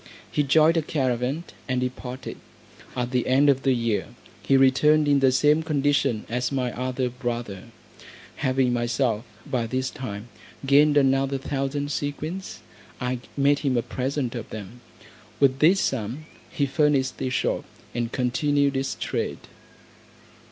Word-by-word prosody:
He - - +1
joined 155 +4 +4
a - - +3
caravan, 130 0 -1 0.3
and 130 -1 +1
departed. 125 0 -5 0.6
At 125 0 -2
the 125 -2 0
end 135 +3 +4
of 135 -1 -1
the 135 -2 +2
year 115 -5 -1 0.3
he 135 - +3
returned 150 +3 +4
in 145 -1 +4
the 135 -1 +4
same 150 +4 +3
condition 145 -6 +1
as 125 +1 -1
my 130 -3 -1
other 130 +1 -1
brother. 120 -5 -4 0.7
Having 130 -1 +1
myself 120 -1 0 0.2
by 125 -6 -1
this 130 +3 -2
time 115 -5 -7 0.4
gained 145 +2 +5
another 135 0 +3
thousand 140 +1 -2
sequins, 150 - -4 0.4
I 125 0 -2 0.2
made 140 +1 +3
him 135 -4 0
a 120 - +1
present 130 -1 -2
of 120 -3 -6
them. 110 +3 -9 0.6
With 135 -1 +3
this 175 +6 +5
sum 130 - -2 0.2
he 145 - 0
furnished 140 -1 +1
his 130 -1 -1
shop, - - 0 0.3
and 120 -1 -2
continued 140 +3 +1
his 135 0 -2
trade. - - -3
130 Hz, 145 wpm, -25 LUFS, 125-145 Hz, 0.7 s, gained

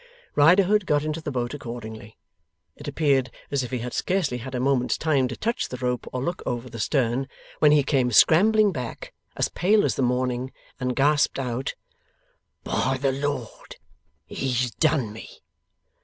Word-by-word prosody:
Riderhood 185 +6 +4
got 145 0 +2
into 155 +1 -3
the 155 - -4
boat 125 -2 -2
accordingly. 110 -5 -8 0.6
It - - -11
appeared 135 -5 +1 0.2
as 140 -1 +1
if 125 - -5
he 130 - -2
had 120 +1 -5
scarcely 175 -10 0
had 130 +2 -7
a - - -1
moment's 130 -1 +1
time 145 -5 +1
to 125 - -6
touch 230 +2 -2
the 125 - -5
rope 125 -1 -2
or 125 0 -3
look 175 +5 -3
over 120 0 -4
the 115 - -7
stern, 130 +1 0 0.3
when 150 - +6
he 150 -1 +5
came 130 -3 +1
scrambling 205 - +5
back, 125 -8 -6 0.2
as - - +1
pale 205 +4 +2
as - - +1
the - - -2
morning, 125 0 0 0.3
and 125 -1 -1
gasped 145 +1 +2
out: 130 -1 -3 0.9
'By 130 +2 0
the 135 0 +1
Lord, 140 -3 -4 0.5
he's 125 +2 -1
done 140 -9 +1
me! 110 - -10
130 Hz, 170 wpm, -25 LUFS, 125-150 Hz, 0.9 s, when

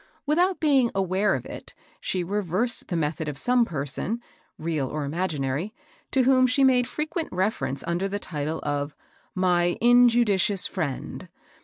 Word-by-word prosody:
Without 350 +5 +2
being 275 -6 +3
aware 195 +1 +1
of - - -5
it, - - -9 0.2
she 185 -2 -2
reversed 205 +5 -1
the 175 - -3
method 155 -1 -1
of 145 - -6
some 245 - +3
person, 155 - -2 0.4
real 155 -4 -2
or 150 +2 -3
imaginary, 155 - -2 0.3
to 265 - +2
whom 255 0 +4
she 260 +2 +2
made 250 -2 +4
frequent 315 +2 -3
refer 185 -7 0
ence 135 +1 -5
under 175 +3 -1
the 200 +1 -3
title 155 -4 -4
of 145 0 -2 0.2
" - - -38
my 175 0 +2
injudicious 235 -5 +4
friend. 155 -8 -4
190 Hz, 155 wpm, -25 LUFS, 155-245 Hz, 0.4 s, whom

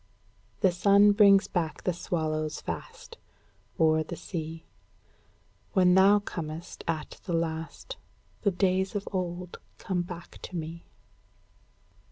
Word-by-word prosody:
The 190 -4 +5
sun 200 +3 +5
brings 200 -1 +6
back 165 -4 -2
the 180 - +1
swallows 155 -3 -2
fast, 465 - -7 0.6
O'er 160 -1 +4
the 155 +2 -5
sea: 160 -1 -6 1.1
When 180 -2 +5
thou 195 +2 +6
comest 165 -5 -6
at 160 -2 -3
the 180 - -3
last, 165 - -3 0.4
The 205 - +3
days 190 +1 +1
of 205 - -3
old 180 -2 -4 0.2
come 185 -2 -2
back 175 -1 -9
to 185 - -8
me. 165 0 -6
175 Hz, 120 wpm, -28 LUFS, 160-195 Hz, 1.1 s, brings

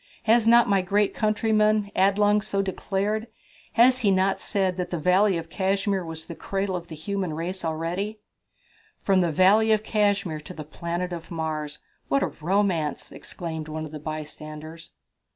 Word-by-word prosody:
Has 225 0 +4
not 235 +1 +6
my 195 -2 +3
great 200 +2 +1
countryman, 215 -1 +2
Adelung, 205 +2 +3
so 195 -1 -1
declared? 205 +3 -2 0.5
Has 255 +2 +5
he 215 -5 +2
not 190 0 +2
said 190 -3 0
that 180 -1 -2
the 175 - -2
Valley 185 +4 +3
of 165 0 -7
Cashmere 195 0 0
was 160 -1 -6
the 170 - -7
cradle 195 +2 -2
of 175 -1 -5
the 160 - -8
human 185 0 -3
race 180 +4 -4
already?" 170 +6 -2 0.9
"From 190 -2 +3
the 170 -2 +1
Valley 200 +6 +5
of 215 -1 +3
Cashmere 200 -7 0
to 180 +4 -10
the 155 - -6
planet 170 +2 -5
Mars 155 -3 -4 0.3
what 140 0 +2
a - - -1
romance!" 175 -4 0
exclaimed 160 +2 -6
one 155 0 -4
of 155 - -9
the 155 - -7
bystanders. 155 +1 -7
185 Hz, 165 wpm, -25 LUFS, 160-205 Hz, 0.9 s, not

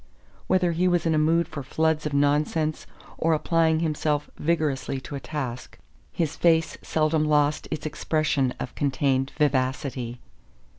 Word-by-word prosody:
Whether 185 -2 +2
he 175 +2 +1
was 175 -2 +1
in 165 - +2
a 155 - +3
mood 165 +2 +2
for 145 - -6
floods 155 +3 0
of 150 - -5
nonsense 150 +2 +1 0.3
or 165 0 +3
applying 160 0 +2
himself 150 -2 -1
vigorously 145 -5 -1
to 140 - -9
a 140 - -3
task, 130 -5 -5 0.3
his 160 -2 -2
face 165 -1 +2
seldom 155 0 +1
lost 150 -1 +2
its 155 - -4
expression 155 -4 0
of - - -5
contained 135 -1 0
vivacity. 130 -3 -1
155 Hz, 145 wpm, -25 LUFS, 140-160 Hz, 0.3 s, a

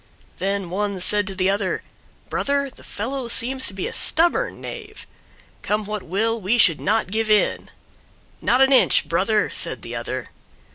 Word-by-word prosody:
Then 195 -1 -2
one 200 0 -2
said 205 +2 +4
to 195 - -5
the 190 +1 +1
other, 200 -2 -2 0.4
"Brother, 280 -1 -1
the - - -17
fellow 250 +4 -5
seems 260 +3 0
to - - -2
be 190 - -3
a - - -5
stubborn 335 +2 +2
knave; 425 -2 -9 0.6
come 210 0 -1
what 210 0 -4
will, 225 +6 -1
we 205 +6 +1
should 180 -9 +4
not 215 -1 0
give 220 +1 -1
in." 210 -1 +2 0.7
"Not 250 +2 +2
an 270 +1 +5
inch, 260 - +5
brother," - - +1
said - - -2
the - - -7
other. - - -5
210 Hz, 170 wpm, -22 LUFS, 195-255 Hz, 0.7 s, an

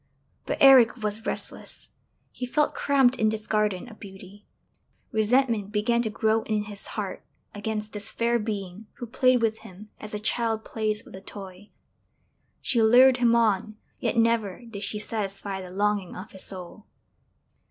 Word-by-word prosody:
But - - -1
Eric 250 -4 +7
was 210 +1 -3
restless, - - -4 0.4
he 250 - -5
felt 300 +4 +1
cramped 270 -3 +3
in 215 -1 +2
this 215 0 -4
garden 210 0 0
of 220 -3 -13
beauty; 195 0 -12 0.6
resentment 220 -2 +1
began 230 +3 +1
to 225 - -1
grow 220 +1 +1
in 215 -1 -1
his 205 -1 -5
heart 200 -3 -4 0.3
against 210 +1 -4
this 210 0 -4
fair 235 0 0
being 205 -1 -5
who 240 - -7
played 255 +1 +2
with 220 -1 0
him 205 +3 -13
as 215 0 -7
a - - -2
child 220 0 -1
plays 215 -1 -2
with - - -12
a 190 - -10
toy. 195 0 -10 0.9
She 240 -3 +3
lured 250 +3 +6
him 235 -1 +3
on, 215 -2 +1 0.2
yet - - -1
never 230 -3 +1
did 205 -3 -8
she 210 +1 -3
satisfy 200 -2 -3
the 185 - -9
longing 200 0 -1
of 185 - -9
his 190 - -4
soul! 190 +3 -10
215 Hz, 165 wpm, -26 LUFS, 205-230 Hz, 0.9 s, Eric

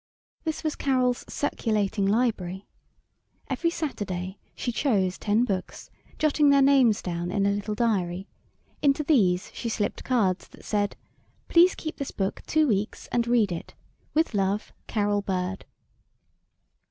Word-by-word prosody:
This 315 -1 -2
was 310 -1 -1
Carol's 255 -3 +1
"Circulating 210 -7 0
Library." 200 -4 0 0.9
Every 335 - +1
Saturday 200 - -4 0.2
she 245 - -2
chose 200 -8 +1
ten 215 +3 +2
books, 190 -5 -4 0.3
jotting 300 -1 +3
their 280 -1 +6
names 260 -6 +4
down 175 -1 -3
in 200 +2 +1
a 200 - +3
little 205 +1 -2
diary; 195 -5 0 0.5
into 285 +1 +3
these 205 - +2
she 230 - -4
slipped 210 -2 -2
cards 200 -8 +1
that - - -17
said: 205 -1 0 0.5
"Please 350 +2 +6
keep 315 - -6
this 280 - -4
book 195 -1 -2
two 310 0 +3
weeks 210 -2 -1
and 235 -1 +1
read 235 -5 +3
it. 170 - -6 0.4
With 320 -4 +2
love, 200 +1 0
Carol 205 -2 +1
Bird." 190 -1 -3
210 Hz, 140 wpm, -26 LUFS, 195-270 Hz, 0.9 s, their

